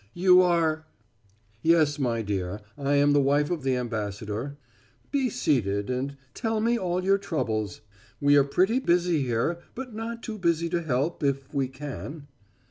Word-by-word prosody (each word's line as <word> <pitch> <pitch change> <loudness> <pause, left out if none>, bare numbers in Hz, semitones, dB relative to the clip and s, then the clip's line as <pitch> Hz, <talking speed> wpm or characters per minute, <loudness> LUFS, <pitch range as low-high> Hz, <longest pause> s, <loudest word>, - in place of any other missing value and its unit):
"You 180 +1 +6
are 160 -3 +1 0.4
" 105 +1 -36
"Yes, 155 -3 +3
my 115 -4 0
dear, 100 -1 -3
I 140 0 0
am 145 0 +4
the 145 - +5
wife 145 +3 +2
of 170 -4 -1
the 135 -1 +1
ambassador. 110 +2 -4 0.5
Be 270 -3 +1
seated 100 - 0
and 135 +2 -3 0.2
tell 225 -2 -1
me 230 +2 +2
all 180 -4 -1
your 195 +1 +3
troubles. 110 - -2 0.4
We 145 0 +4
are 140 - +6
pretty 190 - +2
busy 175 - +2
here, 130 +7 0 0.2
but 255 -2 -6
not 230 +1 -5
too 215 -2 -5
busy 170 -2 +1
to 170 +1 0
help 145 +1 -1
if 135 -1 -1
we 135 -2 +1
can." 145 +2 -7
145 Hz, 165 wpm, -26 LUFS, 125-175 Hz, 0.5 s, You